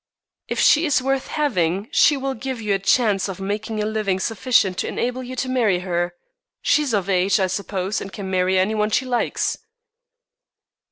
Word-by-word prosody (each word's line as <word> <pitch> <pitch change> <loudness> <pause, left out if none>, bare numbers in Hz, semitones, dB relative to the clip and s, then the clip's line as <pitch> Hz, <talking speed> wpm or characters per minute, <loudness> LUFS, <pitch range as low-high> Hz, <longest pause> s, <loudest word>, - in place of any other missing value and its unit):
"If - - -3
she 315 +3 +5
is 290 - +3
worth 270 +1 -1
having 200 - 0
she 290 - +4
will 270 0 -2
give 260 0 -5
you 210 -2 -1
a 195 - 0
chance 200 -1 +2
of 195 - -6
making 215 +3 -3
a 210 - 0
living 215 -3 -1
sufficient 205 -3 +1
to - - -1
enable 250 +1 -2
you 255 0 -7
to 255 - -2
marry 225 -8 +1
her. 175 -1 -2 0.5
She 300 - +3
is 270 -7 0
of 195 -2 -1
age, 190 +1 +2
I 190 - +3
suppose, 190 +1 -3
and 195 - -7
can 200 -1 -6
marry 185 0 +2
any 190 +4 +2
one 210 0 0
she 260 +5 +1
likes." 245 -2 -1
210 Hz, 190 wpm, -22 LUFS, 190-255 Hz, 0.5 s, she